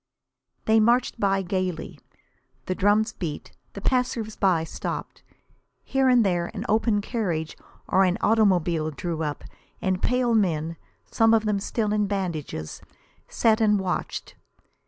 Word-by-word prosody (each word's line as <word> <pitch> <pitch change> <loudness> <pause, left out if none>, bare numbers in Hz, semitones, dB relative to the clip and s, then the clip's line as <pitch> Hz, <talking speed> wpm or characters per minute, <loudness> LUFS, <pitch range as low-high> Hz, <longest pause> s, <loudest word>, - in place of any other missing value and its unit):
They 220 0 +4
marched 240 +2 +2
by 195 -1 +1
gaily. 185 -2 -3 0.7
The 185 - -1
drums 210 +4 +2
beat. 160 -8 -6 0.2
The 200 - -8
passers 235 -3 0
by 180 -5 +2
stopped. 160 - -6 0.6
Here 270 -1 +2
and 245 -3 +5
there 175 -2 0
an - - -4
open 220 -1 +2
carriage 180 -9 -2 0.3
or 190 - +4
an 185 -1 +2
automobile 180 -7 +2
drew 160 +2 -4
up, 150 -2 -3 0.4
and 185 -1 -1
pale 250 -1 +1
men, 165 -6 +1 0.4
some 225 0 +4
of 220 -1 +1
them 210 -2 +1
still 210 +1 -1
in 210 -1 +1
bandages, 170 - -4 0.5
sat 225 0 +2
and 210 -2 +4
watched. 185 -2 -3
200 Hz, 135 wpm, -25 LUFS, 175-220 Hz, 0.7 s, and